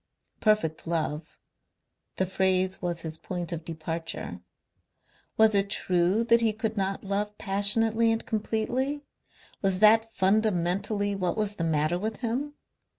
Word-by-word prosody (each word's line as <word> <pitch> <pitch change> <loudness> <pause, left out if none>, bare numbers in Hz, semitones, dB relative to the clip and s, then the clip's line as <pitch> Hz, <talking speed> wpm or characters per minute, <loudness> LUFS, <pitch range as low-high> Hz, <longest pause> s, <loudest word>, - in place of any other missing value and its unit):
"Perfect 210 -9 +1
love," 155 -1 -3 0.8
the 190 - 0
phrase 190 0 +1
was 175 -2 -2
his 160 -1 -6
point 175 0 -5
of 165 -1 -4
departure. 160 - -5 1.0
Was 220 0 +5
it 200 0 +3
true 185 +3 +1
that 235 0 +4
he 225 -2 +2
could 220 0 -3
not 195 -1 -2
love 205 +1 -2
passionately 220 +3 +3
and 225 0 -2
completely? 245 +6 -2 0.6
Was 195 -2 +1
that 225 +2 +5
fundamentally 200 0 +1
what 185 0 -2
was 210 -1 -2
the 165 - -2
matter 160 +1 +1
with 220 +3 -3
him? 265 +5 -3
200 Hz, 135 wpm, -27 LUFS, 175-220 Hz, 1.0 s, Was